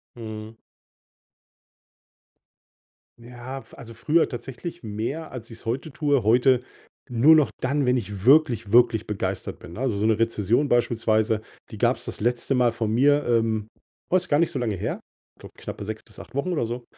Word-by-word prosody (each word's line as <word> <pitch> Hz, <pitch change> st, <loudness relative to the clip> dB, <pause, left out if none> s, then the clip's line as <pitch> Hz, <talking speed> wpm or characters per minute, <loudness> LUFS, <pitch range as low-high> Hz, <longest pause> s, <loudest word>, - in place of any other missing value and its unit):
Mhm. 110 Hz, -1 st, -8 dB, 2.6 s
Ja, 120 Hz, +3 st, -8 dB
f -, -, -17 dB
also, 115 Hz, -3 st, -10 dB
früher 155 Hz, +8 st, +2 dB
tatsächlich 135 Hz, +7 st, -7 dB
mehr, 115 Hz, +9 st, -4 dB
als 120 Hz, -2 st, -8 dB
ich's 115 Hz, -, -11 dB
heute 130 Hz, +6 st, -3 dB
tue. 145 Hz, -5 st, +1 dB
Heute 125 Hz, +3 st, +4 dB, 0.5 s
nur 125 Hz, +6 st, +6 dB
noch 145 Hz, -8 st, +4 dB
dann, 140 Hz, +2 st, 0 dB
wenn 125 Hz, -, +3 dB
ich 105 Hz, -4 st, -4 dB
wirklich, 130 Hz, -7 st, +4 dB
wirklich 120 Hz, -3 st, +4 dB
begeistert 105 Hz, -2 st, -3 dB
bin, 85 Hz, -, -11 dB
ne? 110 Hz, -, -8 dB
Also, 130 Hz, -5 st, 0 dB
so 105 Hz, -, 0 dB
'ne 110 Hz, -1 st, +2 dB
Rezension 115 Hz, +4 st, +1 dB
beispielsweise, 110 Hz, -3 st, +1 dB, 0.3 s
die -, -, -8 dB
gab's -, -, +1 dB
das -, -, -6 dB
letzte 120 Hz, +4 st, 0 dB
Mal 120 Hz, -2 st, +3 dB
von 110 Hz, -2 st, -2 dB
mir, 145 Hz, +4 st, +4 dB
ähm, 115 Hz, -2 st, +1 dB, 0.4 s
war 185 Hz, -, +4 dB
jetzt 185 Hz, -, -4 dB
gar 145 Hz, -, +3 dB
nicht 170 Hz, -, +2 dB
so 135 Hz, -, -3 dB
lange 115 Hz, -4 st, -1 dB
her, -, -, -3 dB, 0.4 s
glaube -, -, -13 dB
knappe 100 Hz, -, -7 dB
6 110 Hz, 0 st, -6 dB
bis -, -, -15 dB
8 -, -, -12 dB
Wochen 140 Hz, +6 st, -1 dB
oder 155 Hz, -9 st, 0 dB
so. 120 Hz, +2 st, -5 dB
120 Hz, 175 wpm, -24 LUFS, 110-135 Hz, 2.6 s, nur